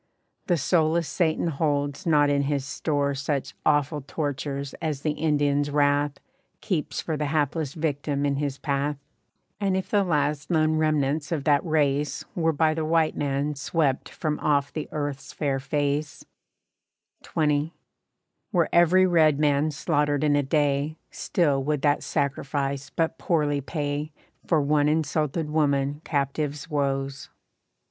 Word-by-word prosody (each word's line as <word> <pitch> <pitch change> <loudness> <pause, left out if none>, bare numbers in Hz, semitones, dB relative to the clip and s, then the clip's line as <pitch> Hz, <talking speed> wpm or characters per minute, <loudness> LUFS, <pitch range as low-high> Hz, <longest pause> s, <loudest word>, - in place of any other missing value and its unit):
The 175 - +3
soulless 160 +2 +2
Satan 165 -3 0
holds 145 +2 -1
not 145 -3 +4
in 140 0 +2
his 140 -1 -1
store 145 -1 -1
Such 140 0 -2
awful 145 0 +2
tortures 140 -1 -4
as 150 -4 -2
the 155 - 0
Indians' 145 -2 +1
wrath 145 0 +1 0.4
Keeps 180 -8 -2
for 160 - -3
the 150 0 -2
hapless 150 -1 -1
victim 145 -2 -1
in 140 -1 0
his 140 -1 -2
path. 140 0 -1 0.6
And 195 -2 +1
if 190 - -4
the 205 -1 +3
last 150 -4 0
lone 155 -1 +2
remnants 155 -1 0
of 155 -4 -1
that 145 -1 +3
race 150 -3 0
Were 165 -2 +1
by 155 +1 +2
the 160 0 -2
white 160 0 +2
man 140 +1 -1
swept 140 -1 -1
from 150 -2 -3
off 145 -2 +1
the 155 - -4
earth's 145 -3 -4
fair 140 -3 -1
face, 145 +1 -2 1.0
XX. 150 -1 0 0.8
Were 175 -5 +2
every 175 +2 +5
red 160 -5 +4
man 145 0 +2
slaughtered 145 -1 0
in 145 -1 +3
a 145 - +3
day, 145 +1 0
Still 145 -6 0
would 150 -1 -1
that 145 -1 +3
sacrifice 140 -1 -2
but 160 +2 -1
poorly 150 -4 +1
pay 145 +1 -3 0.4
For 165 - +3
one 145 0 +2
insulted 155 0 0
woman 145 -1 +1
captive's 145 +1 -2
woes. 135 -1 -2
145 Hz, 140 wpm, -25 LUFS, 140-155 Hz, 1.0 s, every